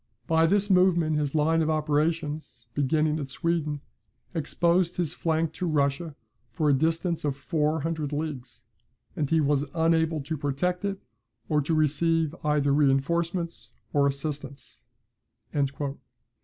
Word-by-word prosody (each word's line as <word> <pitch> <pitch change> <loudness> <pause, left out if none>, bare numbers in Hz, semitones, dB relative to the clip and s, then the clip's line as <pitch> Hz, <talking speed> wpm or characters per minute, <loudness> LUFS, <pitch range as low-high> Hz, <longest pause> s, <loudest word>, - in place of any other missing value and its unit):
By 165 -1 +3
this 200 +3 +2
movement 175 -4 +4
his 150 0 -1
line 160 +2 +3
of 160 - +1
operations, 155 -3 -1
beginning 155 +3 +1
at 140 -2 -5
Sweden, 155 -1 -1 0.5
exposed 170 +2 +1
his 175 -4 -1
flank 160 -1 0
to 180 - -3
Russia 145 +1 0 0.3
for 150 +7 -1
a 145 - +5
distance 165 +4 0
of 140 -2 -1
four 155 +1 0
hundred 155 -2 -2
leagues, 135 -6 -5 0.5
and 145 -3 -1
he 160 - +3
was 145 -1 +2
unable 160 -1 +2
to 150 +4 -3
protect 175 +7 -1
it, 200 -1 -1 0.5
or 150 -1 +3
to 160 +3 0
receive 155 +1 +2
either 150 -2 +2
reinforcements 165 +5 0 0.2
or 140 -2 +4
assistance." 140 -1 -5
155 Hz, 130 wpm, -27 LUFS, 145-165 Hz, 0.5 s, a